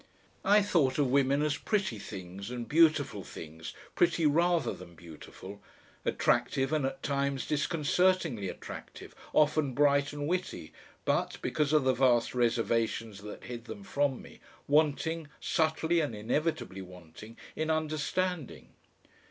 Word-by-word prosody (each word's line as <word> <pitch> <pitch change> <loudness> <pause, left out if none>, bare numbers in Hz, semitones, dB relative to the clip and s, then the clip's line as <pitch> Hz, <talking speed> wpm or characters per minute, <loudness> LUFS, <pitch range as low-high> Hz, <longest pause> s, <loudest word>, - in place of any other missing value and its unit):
I 205 +1 +5
thought 155 -10 +2
of 140 -4 +2
women 140 +1 +3
as 150 0 0
pretty 195 - -1
things 95 +1 -8
and 120 -1 -5
beautiful 155 - +3
things, 80 -1 -9 0.2
pretty 170 -1 +2
rather 170 +3 +3
than 85 -2 -12
beautiful, 85 +4 -11 0.4
attractive 135 +2 +1
and 150 -4 +2
at 135 0 -7
times 140 -2 -1
disconcertingly 155 - +1
attractive, - - -9 0.2
often 150 -3 +2
bright 140 0 +3
and 145 0 -4
witty, 175 - -3 0.3
but, - - 0
because 150 -2 0
of 155 -2 +4
the 130 0 +3
vast 120 -3 +3
reservations 115 -3 0
that 105 0 -9
hid 120 -1 -7
them 200 - -8
from 145 -8 -1
me, - - -14 0.3
wanting, 155 +2 +2
subtly 160 0 +1
and 145 -8 -1
inevitably 120 - -2
wanting, 90 +4 -12 0.2
in 155 0 -2
understanding. 155 +1 -2
140 Hz, 130 wpm, -30 LUFS, 115-155 Hz, 0.4 s, I